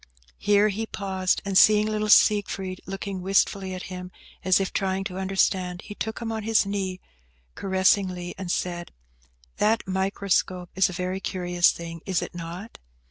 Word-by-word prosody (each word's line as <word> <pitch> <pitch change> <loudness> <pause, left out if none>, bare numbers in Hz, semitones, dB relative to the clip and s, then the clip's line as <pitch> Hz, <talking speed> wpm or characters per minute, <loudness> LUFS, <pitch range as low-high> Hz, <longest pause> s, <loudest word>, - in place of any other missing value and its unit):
Here 205 +1 +4
he 220 +2 -3
paused, 190 -3 -1
and 195 -1 -2
seeing 210 +2 +6
little 215 0 -1
Siegfried 195 -3 +3
looking 195 0 -5
wistfully 195 0 +1
at 185 - -7
him, 180 0 -7 0.3
as 185 +1 +4
if 195 - -2
trying 190 0 -1
to 190 -1 -5
understand, 190 -2 0
he 205 - -8
took 220 +1 -4
him 230 -2 -4
on 220 -1 -3
his 220 0 +2
knee 195 -2 -3 0.5
caressingly, 190 -2 +1
and 185 -2 -4
said, 175 -1 -3 0.6
"That 215 -1 +1
microscope 190 -1 -1
is 190 0 +3
a - - -5
very 185 +2 -3
curious 175 -2 +2
thing, 165 -1 -8
is 185 -3 0
it - - -7
not?" 175 +5 -8
190 Hz, 160 wpm, -25 LUFS, 180-200 Hz, 0.6 s, seeing